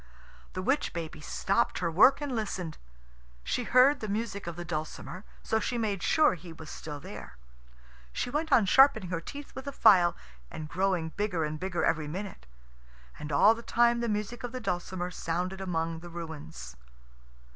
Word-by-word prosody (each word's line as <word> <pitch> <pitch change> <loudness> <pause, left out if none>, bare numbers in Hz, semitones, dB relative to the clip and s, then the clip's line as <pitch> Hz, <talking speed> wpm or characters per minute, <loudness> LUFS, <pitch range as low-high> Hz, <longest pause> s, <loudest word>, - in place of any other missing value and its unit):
The 185 - -4
witch 270 +8 +1
baby 165 -2 -5
stopped 195 +9 0
her 170 -2 -1
work 250 - +6
and 285 -4 -2
listened. 190 -7 -3 0.6
She 245 - -1
heard 265 +5 +5
the 215 - -4
music 205 -2 -3
of 170 - -4
the 175 +1 -6
dulcimer, 170 +3 -5 0.2
so 220 - +1
she 240 +2 -2
made 210 -5 -1
sure 310 - +4
he 175 -1 -9
was 160 -1 -10
still 150 -2 -7
there. 140 - -10 0.7
She 245 - -3
went 310 +3 -1
on 225 - +6
sharpening 220 -4 +5
her 165 -2 -2
teeth 285 +10 -9
with 265 +1 -8
a - - -2
file, 190 -9 +5 0.3
and 155 - -6
growing 185 -1 0
bigger 195 -2 -1
and 155 0 -3
bigger 185 -1 -1
every 155 -2 +1
minute. 185 - -6 0.7
And 150 - -6
all 200 +10 +6
the 230 - -8
time 235 0 +3
the 235 -1 -1
music 215 +3 -3
of 245 0 -5
the 255 - -3
dulcimer 180 -3 -3
sounded 180 +3 -3
among 165 -3 -2
the 175 +1 -10
ruins. 145 - -8
185 Hz, 180 wpm, -29 LUFS, 165-230 Hz, 0.7 s, work